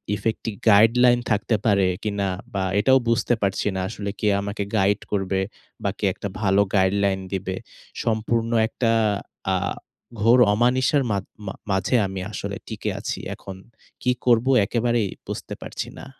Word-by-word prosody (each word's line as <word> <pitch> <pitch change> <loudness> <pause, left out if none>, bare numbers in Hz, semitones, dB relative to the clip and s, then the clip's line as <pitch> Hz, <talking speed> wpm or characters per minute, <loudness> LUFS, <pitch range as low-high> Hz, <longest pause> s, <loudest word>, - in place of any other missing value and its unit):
effective 110 -1 -3
guideline 120 +4 +5
থাকতে 105 +2 +1
পারে 100 -3 +4 0.2
কিনা 100 -2 -1 0.3
বা 95 -1 0 0.2
এটাও 130 +5 +5
বুঝতে 115 +1 +2
পারছি 95 -1 0
না। - - -1
আসলে 100 -1 -5
কে 105 - 0
আমাকে 100 0 -3
গাইড 100 +1 +3
করবে 95 -1 0 0.4
বা 100 - +1
কে - - 0
একটা 105 - -5
ভালো 100 -1 +4
guideline 95 0 +2
দিবে। 95 0 -2 0.5
সম্পূর্ণ 115 +1 0 0.2
একটা 115 0 0 0.6
আ - - +3 0.7
ঘোর 115 +4 +6
অমানিশার 130 +5 +2
মাধ 100 -2 0 0.2
মা 95 - -3 0.2
মাঝে 95 +6 +1
আমি 95 -1 -5
আসলে - - -4
টিকে - - -4
আছি। - - -4 0.2
এখন 95 - -9 0.5
কি 125 - +2
করব 120 -1 +4 0.2
একেবারেই 120 0 +1 0.2
বুঝতে - - -5
পারছি - - -5
না। - - -9
105 Hz, 150 wpm, -23 LUFS, 100-115 Hz, 0.7 s, ঘোর